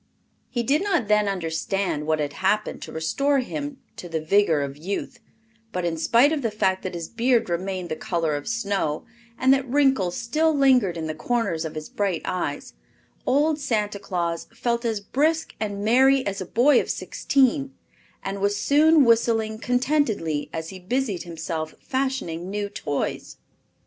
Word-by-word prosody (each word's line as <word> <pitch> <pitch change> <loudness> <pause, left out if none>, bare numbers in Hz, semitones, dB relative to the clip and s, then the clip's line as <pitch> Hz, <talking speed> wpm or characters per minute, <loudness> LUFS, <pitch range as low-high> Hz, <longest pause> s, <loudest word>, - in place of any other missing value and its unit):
He 240 -2 -1
did 280 +6 +2
not 345 - +1
then 210 0 +3
understand 175 -2 -2
what 155 0 +2
had 145 -2 -2
happened 210 +5 0
to - - -7
restore 275 - +1
to 260 - +1
him 290 -1 -5 0.2
the 165 -2 -4
vigor 160 -2 +3
of 140 0 -5
youth, 180 +7 -5 0.5
but 180 -3 -2
in 170 -1 0
spite 235 - +4
of 310 -2 0
the 230 - 0
fact 190 -3 0
that 185 -1 -5
his 165 -1 -4
beard 235 -3 +1
remained 185 0 -2
the 155 - -2
color 170 -6 -1
of 145 - -5
snow 200 -9 -1 0.3
and 260 +1 +5
that 270 -1 0
wrinkles 265 -10 +2
still 305 +6 +1
lingered 250 -10 +4
in 160 - -3
the 155 - -3
corners 170 -2 -1
of 160 - -6
his 155 0 -5
bright 195 -5 -2
eyes, 160 -6 -3 0.5
old 295 +3 +2
Santa 210 -7 -1
Claus 170 -4 -3
felt 235 +1 -1
as 220 -3 -1
brisk 310 +9 0
and 205 -1 -3
merry 265 +3 +4
as 200 0 -3
a 185 - -5
boy 250 +5 +4
of - - -8
sixteen, 275 0 +1 0.5
and 195 0 -4
was 205 0 +1
soon 300 +4 +5
whistling 225 -2 +2
contentedly 245 - 0
as 160 0 -5
he 190 - -9
busied 205 0 -1
himself 160 -2 -5
fashioning 260 -11 -2
new 205 0 -2
toys. 145 -8 -4
205 Hz, 170 wpm, -24 LUFS, 170-260 Hz, 0.5 s, and